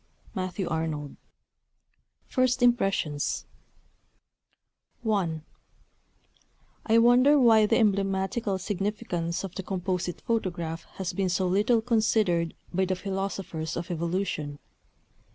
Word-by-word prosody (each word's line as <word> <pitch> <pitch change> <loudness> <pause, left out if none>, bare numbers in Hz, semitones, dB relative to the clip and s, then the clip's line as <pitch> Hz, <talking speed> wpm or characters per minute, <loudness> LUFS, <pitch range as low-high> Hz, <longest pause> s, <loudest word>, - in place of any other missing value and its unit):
MATTHEW 185 0 -3
ARNOLD. 160 -3 -3 1.1
First 255 0 +1
Impressions 195 - +1 1.6
I 175 -7 0 1.5
I 225 0 +5
wonder 245 +5 +6
why 225 -5 +6
the - - +3
emblematical 195 0 +1
significance 190 -3 -2
of 190 -2 -6
the 190 - -4
Composite 180 -2 -3
Photograph 175 -7 -2
has 190 -2 -3
been 195 -2 0
so 185 +1 +1
little 210 +5 +3
considered 215 -7 +1 0.2
by 190 +2 +2
the 185 0 0
philosophers 190 -4 -4
of 175 +2 -4
evolution. 170 -3 -2
190 Hz, 100 wpm, -27 LUFS, 170-220 Hz, 1.6 s, wonder